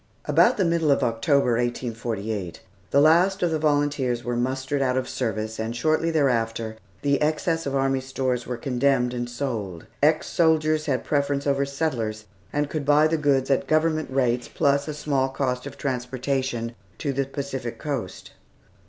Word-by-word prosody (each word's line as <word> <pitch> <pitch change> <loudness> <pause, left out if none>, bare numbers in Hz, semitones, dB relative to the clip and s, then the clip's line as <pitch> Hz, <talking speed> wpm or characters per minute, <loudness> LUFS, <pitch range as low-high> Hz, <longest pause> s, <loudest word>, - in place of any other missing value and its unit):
About - - +4
the 190 - +2
middle 170 -2 +1
of 140 - +3
October, 125 +3 +2
1848, 110 -6 -3 0.3
the 140 - +4
last 175 +6 +4
of 175 - +2
the 160 - 0
volunteers 145 -5 +1
were 120 +1 -2
mustered 130 +3 -1
out 130 -1 +1
of 130 -1 -1
service, 110 -3 -3
and 110 +1 -3
shortly 155 +5 +1
thereafter 115 -7 0 0.3
the 140 0 +2
excess 160 +1 0
of 140 - -2
army 135 0 +1
stores 130 -2 -2
were 125 0 -3
condemned 125 0 +1
and 120 0 -3
sold. 115 -9 -4 0.2
Ex 155 +2 +3
soldiers 155 -2 +2
had 130 -3 0
preference 140 -1 0
over 140 -1 +1
settlers, 120 -8 -2 0.3
and 145 0 0
could 150 0 -3
buy 145 +2 +5
the 160 +1 +2
goods 140 -3 +1
at 135 - +1
Government 155 0 +1
rates, 125 -2 +1
plus 140 +1 +1
a 155 - -4
small 140 -3 0
cost 130 -2 -2
of - - -9
transportation 130 -2 -2 0.2
to 140 -3 -2
the 135 +1 0
Pacific 135 -4 -5
coast. 125 -8 -5
135 Hz, 165 wpm, -24 LUFS, 120-150 Hz, 0.3 s, buy